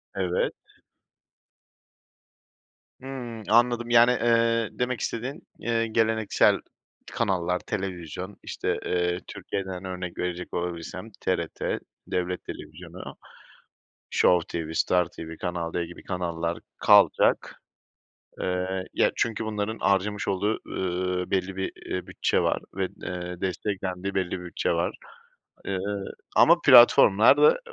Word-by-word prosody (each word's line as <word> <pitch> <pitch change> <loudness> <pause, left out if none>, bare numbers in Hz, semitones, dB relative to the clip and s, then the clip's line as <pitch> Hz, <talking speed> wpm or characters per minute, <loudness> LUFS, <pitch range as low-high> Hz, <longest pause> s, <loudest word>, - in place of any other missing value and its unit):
Evet. 90 -2 0 2.5
Hımm, 125 -4 -7
anladım, 120 +1 +3
yani, 120 +1 +6
ııı, 115 -1 +2
demek 125 -2 0
istediğin, 130 +8 -4
eee, 115 -1 0
geleneksel 110 -1 +3 0.5
kanallar, 90 -5 0
televizyon, 95 0 -5
işte, - - -2
ııı, 90 0 0
Türkiye'den 95 -1 -5
örnek 90 -1 -5
verecek 90 0 -4
olabilsem 90 +4 -4
TRT, 85 -3 -1 0.3
devlet 90 0 -2
televizyonu, - - -9 1.0
Show 90 -2 +3
TV, 80 -1 -4
Star 90 +1 +3
TV, 80 0 -9
Kanal 85 -2 -3
D 85 -1 -1
gibi 85 - -12
kanallar 85 -2 -2 0.2
kalacak. - - +4 0.8
Eee, 95 +1 -2
ya, - - +3
çünkü 115 -1 -1
bunların 110 +1 -2
harcamış 100 +1 +1
olduğu, 100 +3 0
ııı, 90 0 -2
belli 95 0 0
bir, 95 0 -2 0.2
ııı, 90 -1 -3
bütçe - - 0
var - - +1
ve, 95 -1 0 0.2
ııı, 90 0 -5
desteklendiği 95 0 -3
belli 95 -2 0
bir 90 -1 -4
bütçe 85 - -1
var. - - 0 0.7
Eee, 95 -1 -2 0.6
ama - - +7
platformlar 105 +3 +8
da 470 +2 +5
95 Hz, 115 wpm, -26 LUFS, 90-110 Hz, 2.5 s, platformlar